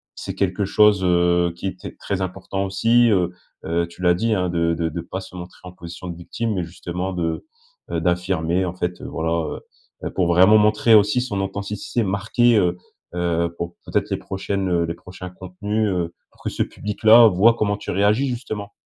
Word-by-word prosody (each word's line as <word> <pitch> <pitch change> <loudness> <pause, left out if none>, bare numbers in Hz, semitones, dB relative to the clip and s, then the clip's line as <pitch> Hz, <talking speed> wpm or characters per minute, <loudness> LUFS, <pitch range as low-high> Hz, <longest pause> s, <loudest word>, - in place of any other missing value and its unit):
c'est - - -6
quelque 100 +1 0
chose, 105 -1 +4
heu, 85 -1 +2
qui 85 - -5
était 95 -1 -7
très 100 -1 -3
important 95 +1 -3
aussi, 115 +5 +3
heu, 90 -4 +2 0.4
heu, 85 +1 0
tu 85 +1 -14
l'as 90 -1 +4
dit, 115 +5 0
hein, 90 -3 0
de 85 -1 +1
de 80 0 -1
de 85 +2 -5
pas 90 +3 -6
se 95 -1 -12
montrer 90 0 -9
en 90 - -8
position 85 0 -9
de 85 -1 -6
victime 110 +5 -3
mais 90 - -1
justement 90 +2 -5
de, 85 -2 -2 0.5
heu, - - -1
d'affirmer 90 0 0
en 90 - -3
fait, 90 -1 -3
heu, - - -8
voilà, 80 0 -2
heu, 80 -3 -2 0.5
heu, - - -6
pour 95 - +1
vraiment 95 +5 +6
montrer 105 +2 +4
aussi 105 +4 +4
son 105 -6 -3
authenticité 100 +4 -3
marquée, 110 +4 +2
heu, 90 -3 +2 0.4
heu, 85 -1 0
pour, 85 0 -5
peut-être - - -1
les - - 0
prochaines, 95 0 -3
heu 85 -1 +1
les 85 - -4
prochains 90 0 -10
contenus, 105 +4 -3
heu, 85 -3 -2 0.2
pour - - -24
que - - -1
ce - - -1
public-là 110 +3 +5
voie 105 +4 +5
comment 105 -3 0
tu - - -6
réagis, 105 +7 +2
justement. 110 -5 -5
95 Hz, 200 wpm, -22 LUFS, 85-105 Hz, 0.5 s, vraiment